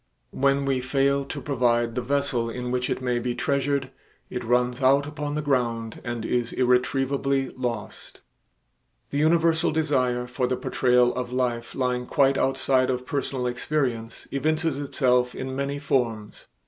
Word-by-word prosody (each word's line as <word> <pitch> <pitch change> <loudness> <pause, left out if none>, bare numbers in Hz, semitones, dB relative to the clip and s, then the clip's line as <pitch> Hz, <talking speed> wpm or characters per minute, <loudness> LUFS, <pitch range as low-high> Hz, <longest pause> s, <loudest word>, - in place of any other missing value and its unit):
When 140 +1 +1
we 135 -2 +1
fail 140 +1 +1
to 145 - -5
provide 120 -3 +1
the 125 - -1
vessel 130 -2 0
in 125 +1 -4
which 125 0 -1
it - - -2
may 125 -1 +1
be 120 0 -2
treasured, 140 -1 0 0.4
it 125 - -4
runs 125 +2 +1
out 135 +2 +4
upon 150 0 -4
the 150 - -2
ground 115 -5 -1
and 120 -2 -4
is 120 -1 0
irretrievably 135 +2 +1
lost. 115 -4 -5 0.9
The 140 - -1
universal 165 +1 +3
desire 130 -6 +1
for 125 +1 -1
the 125 0 -1
portrayal 125 -1 +2
of 125 -1 -4
life 120 -2 -2
lying 125 -1 -1
quite 135 -1 +3
outside 130 -1 +2
of 125 0 -2
personal 135 -2 -2
experience 125 -2 -2
evinces 155 +1 0
itself 125 -3 +1
in 130 0 -4
many 140 +1 -2
forms. 120 -7 -2
130 Hz, 150 wpm, -25 LUFS, 125-140 Hz, 0.9 s, out